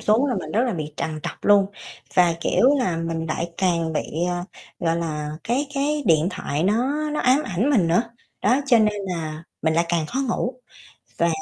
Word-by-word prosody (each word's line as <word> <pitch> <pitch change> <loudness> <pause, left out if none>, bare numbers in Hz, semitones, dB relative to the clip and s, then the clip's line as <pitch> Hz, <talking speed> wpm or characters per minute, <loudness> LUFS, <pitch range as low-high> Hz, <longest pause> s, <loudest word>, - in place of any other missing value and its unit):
xuống 225 +6 +3
là 260 - 0
mình 155 -6 -5
rất 225 - +3
là 245 - 0
bị 155 -4 -4
trằn 155 -1 -3
trọc - - -7
luôn 205 -1 +5 0.5
và, 175 -2 +5
kiểu 245 - +3
là, 180 -10 0
mình 165 -1 -3
lại 170 +2 -2
càng 170 -4 +1
bị, - - -2 0.2
à, 175 0 -2 0.4
gọi 165 -2 +1
là, 150 -3 -3
cái 260 +5 0
cái 290 +2 0
điện 160 +1 +4
thoại 150 -5 -3
nó 270 +9 +1
nó 300 - -1
ám 260 +4 +4
ảnh 205 +9 0
mình 210 -12 +3
nữa, 175 +7 +3 0.4
đó 250 +7 +3
cho 240 -4 +6
nên 210 -1 +2
là 160 -3 -4 0.2
mình 160 0 +2
lại 170 +1 +3
càng 170 -2 0
khó 255 - -3
ngủ. 245 +2 -1 0.6
Và 170 - +3
180 Hz, 205 wpm, -23 LUFS, 165-240 Hz, 0.6 s, cho